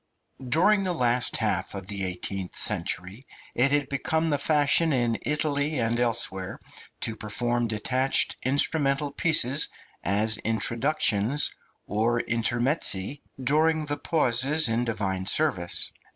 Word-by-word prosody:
DURING 185 +11 +3
the 185 -2 -1
last 125 -3 +1
half 100 -4 -1
of 95 -1 -7
the 100 -2 -4
eighteenth 95 0 -4
century 100 +8 0 0.3
it 130 +3 +3
had 145 -1 +1
become 160 +3 -1
the 145 - +1
fashion 150 +2 +2
in 120 -4 0
Italy 150 0 0
and 115 +1 0
elsewhere 115 -6 -2 0.4
to 115 - -2
perform 120 +3 -1
detached 130 +5 0
instrumental 140 +1 +1
pieces 145 -3 +3 0.3
as 105 +3 +2
introductions 115 +2 +1 0.3
or 115 +4 0
intermezzi 120 - 0 0.2
during 155 +3 +2
the 145 0 -3
pauses 145 0 +1
in 115 +2 0
Divine 95 -5 -2
service. 90 - +1
120 Hz, 120 wpm, -26 LUFS, 110-145 Hz, 0.4 s, DURING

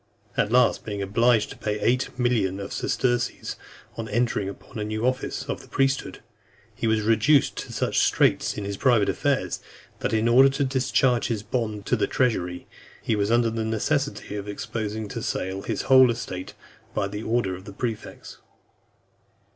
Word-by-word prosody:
At 105 - +1
last, 125 +1 +4
being 100 -2 -4
obliged 110 +3 +2
to - - -9
pay 105 -1 -2
eight 125 +4 +1
millions 110 -6 +1
of 100 - -6
sesterces 120 -1 -1 0.4
on 115 -1 -4
entering 110 -3 0
upon 100 - -10
a - - -1
new 110 +2 -2
office 130 +1 -1
of 140 - -5
priesthood, 135 -1 0 0.5
he - - -2
was 110 -1 +2
reduced 115 +7 +3
to - - -6
such - - 0
straits - - +2
in 105 - -4
his 100 0 -4
private 120 -5 +3
affairs, - - 0 0.4
that - - -1
in 110 +1 +2
order 130 +3 +7
to 135 +1 -1
discharge 130 -2 +2
his 110 -4 -2
bond 110 -2 -3
to 125 - +2
the 110 - 0
treasury, 90 -9 0 0.4
he 110 - +1
was 100 0 0
under 115 0 +3
the 115 0 -2
necessity 115 +2 -1
of 100 0 -5
exposing 105 +1 -4
to - - -5
sale 95 +1 -3
his - - -3
whole 130 -1 +7
estate, 95 -6 -5 0.4
by - - +1
an 105 +2 -5
order 110 -5 0
of 95 +1 -12
the 100 - -9
prefects. 110 0 -6
110 Hz, 170 wpm, -25 LUFS, 105-125 Hz, 0.5 s, order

